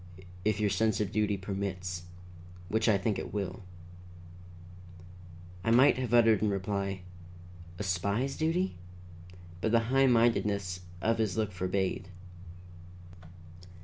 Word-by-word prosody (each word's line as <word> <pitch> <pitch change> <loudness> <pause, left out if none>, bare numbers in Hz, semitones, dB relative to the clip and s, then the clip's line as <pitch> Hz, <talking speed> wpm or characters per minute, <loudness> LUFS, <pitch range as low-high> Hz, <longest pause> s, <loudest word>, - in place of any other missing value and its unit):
"If 105 -1 +1
your 105 -2 +1
sense 110 +2 +1
of 105 -2 -1
duty 105 -1 +1
permits, 95 -2 -4 0.6
which 110 +3 +2
I 105 - +5
think 105 +1 -1
it - - -6
will." 100 -1 -4 2.0
I 115 - 0
might 125 +5 +6
have 125 -3 -3
uttered 115 -3 +5
in 105 - +2
reply, 100 0 -2 0.8
"A 105 - -4
spy's 100 +8 -1
duty?" 165 - 0 0.8
but 110 - 0
the 115 +2 +2
high 135 0 +5
mindedness 105 -6 +2 0.2
of 115 0 +2
his 110 -2 0
look 110 -2 0
forbade. 95 0 -2
105 Hz, 120 wpm, -30 LUFS, 95-115 Hz, 2.0 s, might